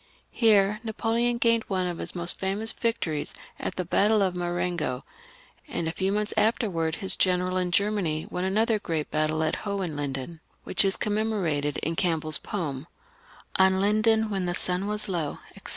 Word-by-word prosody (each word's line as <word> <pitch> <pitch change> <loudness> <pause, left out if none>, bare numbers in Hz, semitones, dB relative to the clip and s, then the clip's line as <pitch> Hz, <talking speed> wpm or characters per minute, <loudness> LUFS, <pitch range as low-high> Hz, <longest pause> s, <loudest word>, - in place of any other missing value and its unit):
Here 210 -2 +3
Napoleon 230 +2 0
gained 230 -1 +2
one 185 -2 0
of 175 -1 -3
his - - -5
most 175 0 +2
famous 200 +4 +2
victories 175 - -2 0.2
at - - -4
the 180 - -3
battle 210 +4 +3
of 185 -2 0
Marengo; 175 -6 -2 0.6
and 165 - -3
a - - 0
few 190 +3 -1
months 210 +1 -1
afterwards 175 -8 +1
his 190 -3 0
general 185 0 +1
in 180 -1 0
Germany 180 -5 0
won 180 - -2
another 215 +3 +2
great 160 -6 -3
battle 155 +1 0
at 155 - 0
Hohenlinden, 160 -7 -4 0.2
which - - +3
is 195 -1 +3
known 210 0 0
from 215 -2 -1 0.6
CampbeU's 160 -4 +2
poem— 155 -7 -4 0.4
" - - -25
On 190 0 +5
Linden, 215 +2 +3
when 190 -2 -1
the 175 0 -1
sun 180 +2 0
was 210 0 0
low," 170 -6 -2 0.2
etc. - - -9
190 Hz, 170 wpm, -26 LUFS, 170-210 Hz, 0.6 s, On